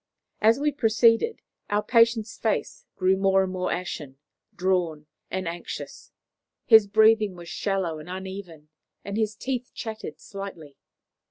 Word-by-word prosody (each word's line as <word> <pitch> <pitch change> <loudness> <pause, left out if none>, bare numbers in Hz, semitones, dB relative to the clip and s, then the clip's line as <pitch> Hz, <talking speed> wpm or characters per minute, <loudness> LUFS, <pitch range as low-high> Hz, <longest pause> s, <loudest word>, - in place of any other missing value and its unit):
As 225 +4 +5
we 295 +1 +1
proceeded, 230 - +3 0.3
our 205 +1 +1
patient's 230 -2 +3
face 220 - -2
grew 185 0 +3
more 195 0 +3
and 185 0 -4
more 185 0 -2
ashen, 150 -6 -5 0.4
drawn, 175 -4 0 0.2
and 185 -2 -3
anxious; 170 +1 -7 0.5
his 220 -3 +7
breathing 215 -1 +4
was 175 -1 -10
shallow 190 -6 -2
and 155 +3 -11
uneven, 185 -4 -8 0.4
and 200 +1 -4
his 215 -1 0
teeth 255 +1 -3
chattered 220 -8 -6
slightly. 185 -8 -9
195 Hz, 135 wpm, -26 LUFS, 180-220 Hz, 0.5 s, his